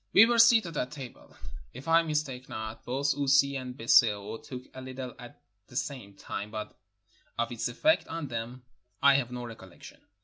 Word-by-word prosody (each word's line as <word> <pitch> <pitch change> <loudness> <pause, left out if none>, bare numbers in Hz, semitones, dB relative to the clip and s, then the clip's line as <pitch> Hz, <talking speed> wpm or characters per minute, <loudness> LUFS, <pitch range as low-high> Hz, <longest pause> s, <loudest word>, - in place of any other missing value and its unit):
We 210 - +9
were 235 0 +2
seated 225 -7 +6
at 125 - -1
table: 135 -4 -11 0.4
if 130 +5 -10
I 165 +1 +6
mistake 150 -6 -3
not, 110 0 -6
both 140 +3 0
Ussi 140 0 +3
and 130 -1 -6
Biseo 110 -3 +3
took 125 -1 -8
a 130 - -11
Httle 130 -1 -7
at 120 -1 -12 0.3
the - - -15
same 120 -7 -4
time, 100 +1 -6
but 105 0 -6 0.6
of 115 0 -1
its 120 0 -2
effect 310 - +2
on 165 -3 -4
them 120 +1 -5 0.4
I 140 0 +8
have 130 -3 +1
no 125 0 -5
recollec 95 -6 -12
tion. - - -12
130 Hz, 180 wpm, -29 LUFS, 115-145 Hz, 0.6 s, We